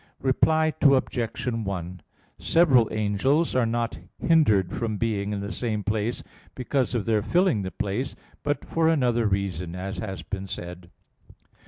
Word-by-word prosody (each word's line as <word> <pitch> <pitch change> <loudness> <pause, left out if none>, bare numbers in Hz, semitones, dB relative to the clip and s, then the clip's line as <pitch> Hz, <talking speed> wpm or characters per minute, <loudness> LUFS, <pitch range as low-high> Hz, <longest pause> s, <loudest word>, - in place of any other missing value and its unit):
Reply 155 +4 +3
Obj. 130 -4 +2
1: 95 -7 -3 0.4
Several 135 -9 +4
angels 110 +10 +1
are 125 -3 +2
not 115 -6 -2 0.2
hindered 110 - +3
from 110 -3 -2
being 105 -2 -1
in 100 -1 -2
the 100 +1 -5
same 110 -4 -2
place 110 +2 -1 0.3
because 130 0 -1
of 115 - -1
their 110 -2 +2
filling 175 - +2
the 95 - -3
place; 105 +8 -3 0.3
but 145 0 -2
for 165 -1 +1
another 120 -7 +2
reason, 90 -4 -2
as 95 +1 -5
has 95 -5 -5
been 95 +4 -5
said. 90 -2 -7
110 Hz, 145 wpm, -25 LUFS, 100-130 Hz, 0.4 s, Several